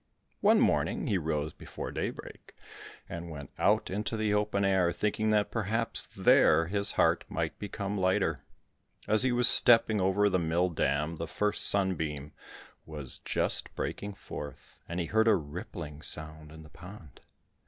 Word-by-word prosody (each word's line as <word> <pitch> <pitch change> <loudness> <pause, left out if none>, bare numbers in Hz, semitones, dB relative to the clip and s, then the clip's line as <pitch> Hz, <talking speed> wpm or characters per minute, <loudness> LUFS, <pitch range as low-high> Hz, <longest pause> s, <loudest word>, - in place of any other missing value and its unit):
One - - +4
morning - - 0
he 100 - 0
rose 80 -1 -3
before - - -8
daybreak - - -7 0.5
and 85 0 -7
went 70 -4 -9
out - - +1
into 105 +3 -3
the 110 -1 0
open 105 -1 0
air, 95 -3 +2
thinking 105 +4 -1
that 105 -1 +1
perhaps 115 +1 -1
there 80 +2 +3
his 100 +3 -2
heart - - +2
might - - -4
become 100 0 -5
lighter. 95 0 0 0.7
As 110 +1 +4
he 130 - +5
was 120 0 +3
stepping 110 -3 +5
over 95 +2 +2
the 95 -2 +1
mill 85 +2 0
dam 75 0 -1
the 85 - -5
first 105 +5 +4
sunbeam 80 -7 -1 0.5
was 75 -5 -5
just - - +2
breaking 100 0 -5
forth, 75 -6 -10
and 85 +1 -4
he 85 - -1
heard 110 +5 +1
a 110 - +5
rippling 75 -1 -7
sound 80 -1 -4
in 80 0 -12
the 75 - -15
pond. 90 -6 -14
95 Hz, 155 wpm, -29 LUFS, 80-105 Hz, 0.7 s, he